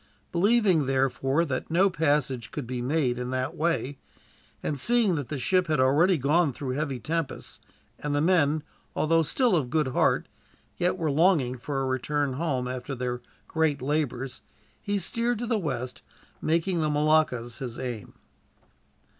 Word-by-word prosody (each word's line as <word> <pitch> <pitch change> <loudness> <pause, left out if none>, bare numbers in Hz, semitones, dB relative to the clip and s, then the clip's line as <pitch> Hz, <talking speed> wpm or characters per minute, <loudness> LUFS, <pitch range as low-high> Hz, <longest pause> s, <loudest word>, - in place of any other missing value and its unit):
Believing, 190 - +3
therefore, 135 +3 +1
that 130 -4 -3
no 180 +4 +4
passage 145 - 0
could 145 - -5
be 125 0 -4
made 130 -2 0
in 125 0 -3
that 130 +1 -2
way, 150 -4 -1 0.6
and 145 -2 -2
seeing 235 - +3
that 145 -6 -3
the 150 - -3
ship 185 +7 +1
had 155 -2 +1
already 155 +8 +4
gone 150 +3 +2
through 130 +2 -4
heavy 140 -1 -2
tempests, 165 +3 -4 0.4
and 145 -1 -2
the - - +2
men, 155 -2 +3 0.3
although 165 +1 +3
still 225 - +2
of 140 -7 0
good 150 0 +1
heart, - - +2 0.5
yet 180 +1 0
were 160 -4 0
longing 150 -5 +3
for 135 +3 -3
a - - -1
return 135 +2 -1
home 130 -4 -1
after 130 +2 -4
their 125 -1 -3 0.3
great 160 -3 +1
labors, 135 -2 -2 0.4
he 205 0 -1
steered 230 +5 0
to 240 - -3
the 230 -2 0
west, 130 -7 -4 0.4
making 170 +2 +1
the 155 - +1
Moluccas 150 -6 +1
his 125 -4 -5
aim. 120 -5 -5
145 Hz, 160 wpm, -27 LUFS, 130-165 Hz, 0.6 s, no